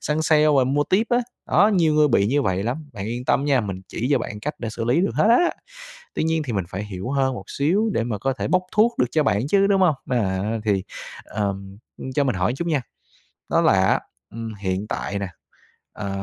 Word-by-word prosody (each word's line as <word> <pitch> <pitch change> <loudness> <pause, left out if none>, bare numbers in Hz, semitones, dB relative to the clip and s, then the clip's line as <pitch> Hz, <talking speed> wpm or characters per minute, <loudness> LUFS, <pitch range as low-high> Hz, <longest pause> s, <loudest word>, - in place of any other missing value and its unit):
săn 150 +1 -1
sale 155 -1 +4
và 130 - +4
mua 145 +3 +1
tiếp 205 +8 +2
á. 240 - +4 0.3
Đó, 205 - +5
nhiều 160 -4 +3
người 150 -1 +4
bị 100 -6 +3
như 140 +6 +1
vậy 95 -4 0
lắm. 130 +8 -3
Bạn 100 -3 -6
yên 120 +3 -4
tâm 135 - +2
nha, 140 -3 +3
mình 95 -3 -5
chỉ 120 - -3
cho 145 - +4
bạn 105 -2 -6
cách 150 +7 -3
để 115 - -4
xử 115 +1 -4
lý 125 +8 +2
được 195 - 0
hết - - +3
á. 295 +10 +5 0.6
Tuy - - 0
nhiên 160 0 +1
thì 135 -5 -4
mình 95 -4 -1
phải 100 +4 -5
hiểu 105 +3 -6
hơn 135 -1 +1
một 95 - -7
xíu 195 +10 +1
để 115 - 0
mà 110 -4 -3
có 135 +6 0
thể 130 - -4
bốc 185 0 +2
thuốc 230 +3 +3
được 125 - +3
cho 155 - +2
bạn 110 -1 +1
chứ, 195 +5 +3
đúng 200 -1 +3
hông? 175 -5 +4 0.2
À, 95 -7 0 0.2
thì, 100 -3 +1 0.4
ờ, 100 -2 -2 0.6
cho 145 - +2
mình 130 - 0
hỏi 90 +4 0
chút 170 - -3
nha. 150 -5 +1 0.7
Đó - - +3
là - - +4
á, - - +3 0.3
ừm, 115 -1 -6
hiện 95 0 -3
tại 100 - -3
nè, 100 - -3 0.7
ờ, 100 -2 -5
130 Hz, 240 wpm, -23 LUFS, 105-155 Hz, 0.7 s, Đó